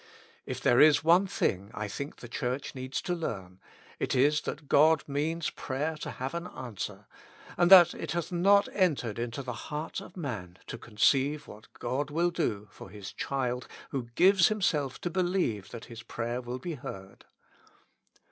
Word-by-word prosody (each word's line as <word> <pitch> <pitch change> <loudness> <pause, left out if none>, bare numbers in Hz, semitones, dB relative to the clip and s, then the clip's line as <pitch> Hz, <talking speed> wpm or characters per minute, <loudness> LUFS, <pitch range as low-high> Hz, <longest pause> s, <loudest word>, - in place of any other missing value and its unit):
If - - -4
there 120 - +4
is 150 -1 +6
one 175 +4 +5
thing 100 - -1
I 105 0 -3
think 140 +8 -6
the 120 - -10
Church 125 +3 -3
needs 130 0 -4
to 180 - -1
learn, 95 - -5 0.4
it - - -1
is 145 +4 +4
that 150 0 -6
God 155 +3 +5
means 155 +3 -1
prayer 150 +4 -3
to - - -5
have 130 +1 -5
an 170 +1 -4
answer, 120 - -6 0.5
and 175 0 +3
that 180 -3 +9
it - - -5
hath 170 +1 -2
not 200 +3 +4
entered 145 - +1
into 120 +3 -3
the 125 -1 -4
heart 150 +7 -5
of 180 - -12
man 105 - -5
to 115 - -7
conceive 135 +7 +2
what 105 - -13
God 130 +4 -2
will 170 +4 +1
do 105 - -2
for - - -11
His 100 0 -9
child 125 -2 -2 0.2
who 125 -4 -3
gives 190 -1 +6
himself 170 - 0
to 175 - -2
believe 175 - 0
that 115 0 -8
his 115 -1 -10
prayer 120 +1 -4
will 125 +1 -5
be 165 +6 -5
heard. 95 -8 -9
140 Hz, 175 wpm, -29 LUFS, 120-170 Hz, 0.5 s, that